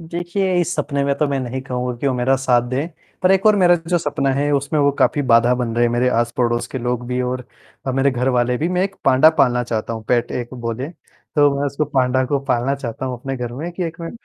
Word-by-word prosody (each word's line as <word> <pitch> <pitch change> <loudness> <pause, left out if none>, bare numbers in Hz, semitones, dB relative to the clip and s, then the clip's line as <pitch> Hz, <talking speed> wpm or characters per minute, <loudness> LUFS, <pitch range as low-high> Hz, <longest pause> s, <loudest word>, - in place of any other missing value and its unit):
देखिए 175 +3 -2
इस 175 0 -1
सपने 140 -2 -1
में 140 0 +1
तो 150 - +2
मैं 140 -1 -1
नहीं 130 +1 -4
कहूँगा 125 -1 -3
कि 140 - -2
वो 135 - +2
मेरा 125 +2 +2
साथ 125 -2 +1
दें 135 +6 -2 0.3
पर 185 - +4
एक 195 0 +3
और 215 -1 +6
मेरा 180 -3 +5
जो 175 -1 +2
सपना 140 -3 -1
है, 145 +2 0
उसमें 140 +2 0
वो 145 0 +4
काफ़ी 145 - +2
बाधा 120 -1 +4
बन 120 -2 -2
रहे 120 - +3
हैं 120 - +2
मेरे 120 +1 +2
आस-पड़ोस 120 0 0
के 130 - -5
लोग 125 0 -2
भी 125 +1 -2
और 125 0 -3 0.4
अ, 130 - 0
मेरे 135 +2 +2
घरवाले 125 -1 +1
भी। 160 - 0
मैं 180 0 0
एक 195 0 -4
पांडा 135 +4 +6
पालना 125 -3 +3
चाहता 115 -1 -3
हूँ 110 -1 -6
पेट 120 -1 +1
एक 120 +1 -4
बोले 120 +2 -4
तो, 145 -3 -1
मैं 145 - +1
उसको 140 +2 -1
पांडा 130 -2 +1
को 140 +2 0
पालना 130 +1 0
चाहता 130 -1 -5
हूँ 125 -1 -4
अपने 135 +2 -5
घर 120 -1 -5
में 155 +8 -5
कि 180 - -4
एक 165 0 -6
मैं 165 - -5
130 Hz, 255 wpm, -20 LUFS, 125-145 Hz, 0.4 s, और